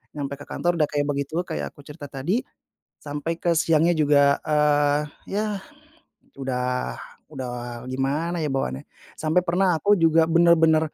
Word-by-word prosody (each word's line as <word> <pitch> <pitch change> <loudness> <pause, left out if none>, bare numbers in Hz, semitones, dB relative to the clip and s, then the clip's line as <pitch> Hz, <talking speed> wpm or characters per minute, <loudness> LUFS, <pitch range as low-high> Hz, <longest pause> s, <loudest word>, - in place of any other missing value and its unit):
nyampe 140 -1 -4
ke 145 - -11
kantor 175 0 -1
udah 150 - +3
kayak 145 -1 0
begitu, 140 +1 -3
kayak - - -4
aku - - -24
cerita 150 -1 -9
tadi, 175 - -1 0.6
sampai 150 +3 -4
ke 170 -1 +1
siangnya 165 +1 +3
juga, 145 -2 +4
eee, 145 -1 +3 0.3
ya, 205 +2 0 1.0
udah 125 -1 -2 0.4
udah 120 -2 -6
gimana, 145 +7 -1
ya, - - 0
bawaannya. 65 - -2 0.4
Sampai 160 +3 +2
pernah 180 +1 +2
aku 205 +5 +4
juga 165 -1 +4
benar-benar 160 -2 +4
150 Hz, 145 wpm, -24 LUFS, 140-165 Hz, 1.0 s, juga